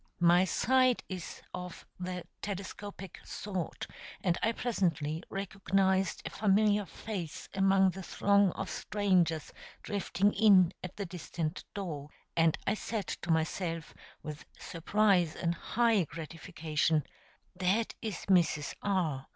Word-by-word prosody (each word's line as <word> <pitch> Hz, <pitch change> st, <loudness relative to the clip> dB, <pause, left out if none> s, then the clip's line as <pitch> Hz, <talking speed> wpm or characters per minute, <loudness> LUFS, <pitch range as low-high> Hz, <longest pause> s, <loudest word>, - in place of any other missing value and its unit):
My 175 Hz, +1 st, +6 dB
sight 255 Hz, +5 st, +3 dB
is 185 Hz, -4 st, -6 dB
of 180 Hz, -1 st, -7 dB
the 180 Hz, -1 st, -4 dB, 0.2 s
telescopic 195 Hz, -1 st, -6 dB
sort, 190 Hz, -5 st, -4 dB, 0.4 s
and 175 Hz, -3 st, +2 dB
I 225 Hz, -, +3 dB
presently 165 Hz, -10 st, -1 dB
recognized 195 Hz, -1 st, +1 dB
a -, -, -4 dB
familiar 210 Hz, -1 st, +3 dB
face 190 Hz, -8 st, -6 dB
among 195 Hz, -1 st, +4 dB
the 190 Hz, +2 st, -7 dB
throng 200 Hz, +1 st, +3 dB
of -, -, -4 dB
strangers 180 Hz, -7 st, +1 dB, 0.3 s
drifting 205 Hz, 0 st, +1 dB
in 190 Hz, -4 st, +6 dB
at 180 Hz, -, -7 dB
the 200 Hz, -, -2 dB
distant 170 Hz, -2 st, -4 dB
door, 155 Hz, -8 st, -4 dB, 0.3 s
and 165 Hz, -1 st, +4 dB
I -, -, +2 dB
said 215 Hz, -1 st, -3 dB
to 175 Hz, -, -5 dB
myself, 165 Hz, 0 st, 0 dB, 0.3 s
with 150 Hz, 0 st, -6 dB
surprise 180 Hz, -1 st, +2 dB
and 170 Hz, -1 st, 0 dB
high 225 Hz, +1 st, +2 dB
gratification, 160 Hz, 0 st, -1 dB, 0.5 s
"That 190 Hz, +5 st, +1 dB
is 220 Hz, -6 st, -4 dB
Mrs. 170 Hz, -6 st, +3 dB
R. 165 Hz, -9 st, 0 dB
185 Hz, 120 wpm, -32 LUFS, 165-200 Hz, 0.5 s, My